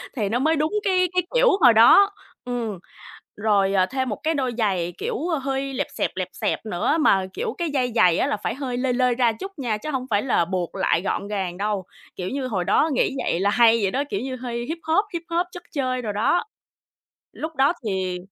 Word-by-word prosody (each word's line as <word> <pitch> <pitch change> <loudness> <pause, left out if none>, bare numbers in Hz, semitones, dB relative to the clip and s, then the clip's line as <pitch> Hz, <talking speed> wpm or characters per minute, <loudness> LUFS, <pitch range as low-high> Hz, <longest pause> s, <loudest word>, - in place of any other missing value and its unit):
thì 210 -5 -1
nó 240 +3 0
mới 315 +4 +2
đúng 310 +5 -1
cái 370 -2 +2
cái 360 -1 +2
kiểu - - +5
hồi 235 - +8
đó, 395 - +7 0.3
ừm. 230 -6 -3 0.6
Rồi, 200 -2 +2
à, 185 -1 +4
thêm 260 +2 -2
một 210 - -2
cái 320 - +1
đôi 260 -4 -1
giày, 185 -6 0
kiểu, 445 0 -3 0.2
hơi 270 0 -2
lẹp - - -2
xẹp, - - -1
lẹp 185 -1 -2
xẹp - - -2
nữa 215 - 0
mà, 195 -11 +3
kiểu, 460 -2 -3
cái 345 -2 -2
dây 255 -4 0
giày 175 -6 +4
á - - +1
là 215 - -1
phải 210 - -3
hơi 260 -3 -4
lơi 250 0 0
lơi 250 -1 +2
ra 240 -2 +3
chút 385 - -7
nha, 230 -5 -1
chứ 305 - -7
hông 260 -2 -2
phải 205 -1 +2
là 240 -10 +2
buộc 180 -1 -3
lại 170 - +1
gọn 200 +1 -2
gàng 190 -4 -3
đâu. 205 -2 -2 0.3
Kiểu 185 0 -4
như, 270 -1 -3
hồi 195 -7 -1
đó 305 - +2
nghĩ 260 - +1
vậy 170 - 0
là 200 +2 +2
hay 230 +1 +5
vậy 195 - +1
đó, 275 +6 0
kiểu 200 +2 -2
như, 260 0 -4
hơi 240 -1 -5
hip 325 +5 -4
hop, 355 +6 +2
hip 340 -1 -3
hop 345 +2 0
chất 355 - -10
chơi 255 -4 -1
đồ 215 - -3
đó. 220 - +1 0.9
Lúc 320 +1 -6
đó 275 +4 +3
thì, 185 -2 -2
245 Hz, 235 wpm, -23 LUFS, 200-285 Hz, 0.9 s, hồi